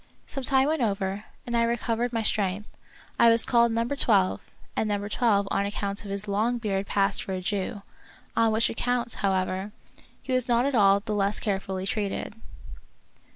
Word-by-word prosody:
Some 275 Hz, -, -6 dB
time 265 Hz, +2 st, +4 dB
went 310 Hz, -2 st, 0 dB
over, 200 Hz, -2 st, -1 dB, 0.2 s
and 240 Hz, -, -3 dB
I 235 Hz, -, +3 dB
recovered 235 Hz, +1 st, 0 dB
my 225 Hz, -2 st, -1 dB
strength. 205 Hz, -1 st, -1 dB, 0.5 s
I 235 Hz, -, +7 dB
was 230 Hz, 0 st, +5 dB
called 235 Hz, -1 st, +3 dB
Number 230 Hz, +4 st, -1 dB
Twelve^ 200 Hz, -8 st, +2 dB, 0.4 s
and 220 Hz, -, 0 dB
Number 205 Hz, 0 st, -1 dB
Twelve 205 Hz, -3 st, +2 dB
on 200 Hz, 0 st, +1 dB
account 200 Hz, -1 st, -4 dB
of 205 Hz, -, -8 dB
his 200 Hz, +1 st, -4 dB
long 220 Hz, +5 st, 0 dB
beard 200 Hz, -4 st, -2 dB
passed 195 Hz, -1 st, +2 dB
for 190 Hz, -, -5 dB
a 185 Hz, -, -2 dB
Jew; 200 Hz, +2 st, -3 dB, 0.5 s
on 225 Hz, -1 st, +3 dB
which 220 Hz, +1 st, +2 dB
account, 240 Hz, 0 st, -1 dB
however, 190 Hz, 0 st, -1 dB, 0.5 s
he 260 Hz, -, -3 dB
was 255 Hz, -1 st, +1 dB
not 240 Hz, +1 st, +3 dB
at 280 Hz, -, 0 dB
all 200 Hz, -3 st, +5 dB
the 215 Hz, +1 st, -4 dB
less 200 Hz, 0 st, 0 dB
carefully 190 Hz, -2 st, -3 dB
treated. 205 Hz, 0 st, -3 dB
210 Hz, 180 wpm, -26 LUFS, 200-235 Hz, 0.5 s, I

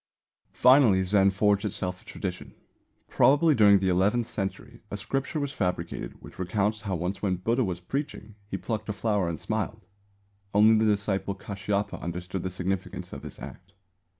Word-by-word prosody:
Finally, 125 Hz, -7 st, +6 dB
Zen 95 Hz, +1 st, +4 dB
forged 100 Hz, +1 st, +2 dB
itself 90 Hz, -3 st, -3 dB
a -, -, -23 dB
tradition. 90 Hz, -3 st, -6 dB, 0.5 s
Probably 150 Hz, +3 st, +4 dB
during 105 Hz, -5 st, +6 dB
the 95 Hz, -1 st, 0 dB
eleventh 100 Hz, +6 st, +2 dB
century 100 Hz, +4 st, -5 dB
a 105 Hz, -, -4 dB
Scripture 135 Hz, -, -2 dB
was 140 Hz, -1 st, -2 dB
fabricated 90 Hz, -7 st, -3 dB
which -, -, -13 dB
recounts 100 Hz, +3 st, 0 dB
how 100 Hz, -3 st, -2 dB
once 90 Hz, +3 st, -3 dB
when 95 Hz, -3 st, +1 dB
Buddha 115 Hz, +8 st, 0 dB
was 90 Hz, -4 st, -3 dB
preaching, 135 Hz, 0 st, -4 dB
he 95 Hz, -, -3 dB
plucked 110 Hz, +1 st, -4 dB
a -, -, 0 dB
flower 100 Hz, -3 st, 0 dB
and 85 Hz, -, -4 dB
smiled. 110 Hz, -1 st, -3 dB, 0.7 s
Only 110 Hz, +2 st, +7 dB
the 110 Hz, -, +3 dB
disciple 100 Hz, -1 st, -1 dB
Kāshyapa 100 Hz, +1 st, -3 dB
understood 90 Hz, +2 st, -4 dB
the 95 Hz, -, -3 dB
significance 95 Hz, +1 st, -4 dB
of -, -, -7 dB
this -, -, -9 dB
act. 80 Hz, +9 st, -11 dB
100 Hz, 165 wpm, -27 LUFS, 95-110 Hz, 0.7 s, Only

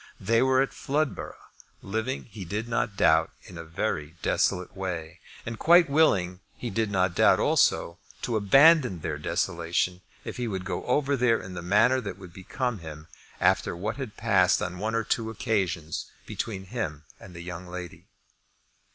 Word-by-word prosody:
They 115 Hz, +4 st, +2 dB
were 130 Hz, 0 st, +4 dB
at 135 Hz, -, -5 dB
Floodborough, 145 Hz, +1 st, -3 dB, 0.3 s
living, 110 Hz, +6 st, -3 dB
he 105 Hz, -3 st, -9 dB
did 105 Hz, +6 st, -4 dB
not 115 Hz, -3 st, -1 dB
doubt, 80 Hz, 0 st, +4 dB
in 90 Hz, -, -12 dB
a 85 Hz, -, -6 dB
very 80 Hz, -2 st, -3 dB
desolate 90 Hz, 0 st, 0 dB
way, 85 Hz, -4 st, -5 dB, 0.3 s
and 115 Hz, -1 st, -5 dB
quite 170 Hz, -2 st, +6 dB
willing, 95 Hz, -, +3 dB, 0.2 s
he 120 Hz, -, -5 dB
did 110 Hz, +1 st, 0 dB
not 95 Hz, -2 st, +1 dB
doubt -, -, +5 dB
also, 85 Hz, +3 st, +2 dB, 0.2 s
to 120 Hz, -, -1 dB
abandon 125 Hz, -, +5 dB
their 75 Hz, -1 st, -3 dB
desolation 85 Hz, +2 st, -1 dB, 0.2 s
if -, -, -6 dB
he 125 Hz, -1 st, -2 dB
would 95 Hz, -4 st, -4 dB
go 95 Hz, -, -3 dB
over 140 Hz, +2 st, +2 dB
there 120 Hz, -3 st, +2 dB
in 95 Hz, -, -9 dB
the 90 Hz, -, -5 dB
manner 115 Hz, +9 st, +3 dB
that 100 Hz, -5 st, -6 dB
would 95 Hz, -3 st, -12 dB
become 115 Hz, +5 st, -3 dB
him 80 Hz, -1 st, -10 dB, 0.3 s
after -, -, +2 dB
what 110 Hz, +5 st, -3 dB
had 130 Hz, -7 st, -6 dB
passed -, -, +3 dB
on 90 Hz, 0 st, -4 dB
one 110 Hz, +3 st, -2 dB
or 115 Hz, -, +1 dB
two 110 Hz, 0 st, -1 dB
occasions 95 Hz, -8 st, -2 dB, 0.2 s
between 95 Hz, -4 st, -5 dB
him 75 Hz, -12 st, -3 dB, 0.2 s
and 90 Hz, -3 st, -13 dB
the 85 Hz, -, -7 dB
young 90 Hz, 0 st, -7 dB
lady. 90 Hz, -1 st, -8 dB
100 Hz, 170 wpm, -27 LUFS, 90-115 Hz, 0.3 s, quite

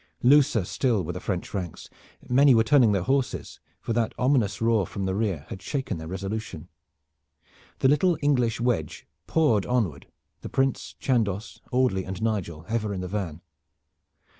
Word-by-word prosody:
Looser 130 Hz, -5 st, +5 dB
still 115 Hz, -2 st, 0 dB
were 85 Hz, +2 st, -4 dB
the 90 Hz, -, -5 dB
French 90 Hz, -1 st, -4 dB
ranks. 90 Hz, -5 st, -5 dB, 0.4 s
Many 135 Hz, +1 st, +5 dB
were 115 Hz, -, +5 dB
turning 125 Hz, -2 st, +5 dB
their 100 Hz, -3 st, +1 dB
horses, 135 Hz, +3 st, -1 dB, 0.2 s
for 115 Hz, -, -3 dB
that 115 Hz, -1 st, 0 dB
ominous 125 Hz, -7 st, +1 dB
roar 115 Hz, -5 st, +2 dB
from 100 Hz, -2 st, -4 dB
the 95 Hz, -, -1 dB
rear 95 Hz, -8 st, -1 dB
had 95 Hz, -, -7 dB
shaken 130 Hz, -, -3 dB
their 80 Hz, -, -7 dB
resolution. 95 Hz, -1 st, -5 dB, 1.1 s
The -, -, +5 dB
little 155 Hz, +5 st, +3 dB
English 125 Hz, -6 st, +1 dB
wedge 120 Hz, 0 st, -1 dB, 0.2 s
poured 120 Hz, -11 st, +2 dB
onward, 100 Hz, -, -1 dB, 0.3 s
the -, -, -7 dB
Prince, 135 Hz, 0 st, -1 dB
Chandos, 110 Hz, -6 st, -1 dB
Audley 125 Hz, -7 st, +2 dB
and 95 Hz, 0 st, -6 dB
Nigel 95 Hz, -8 st, -2 dB
ever 110 Hz, -3 st, -1 dB
in 90 Hz, -, -4 dB
the 90 Hz, -, -4 dB
van. 90 Hz, -5 st, -4 dB
110 Hz, 160 wpm, -26 LUFS, 95-125 Hz, 1.1 s, Looser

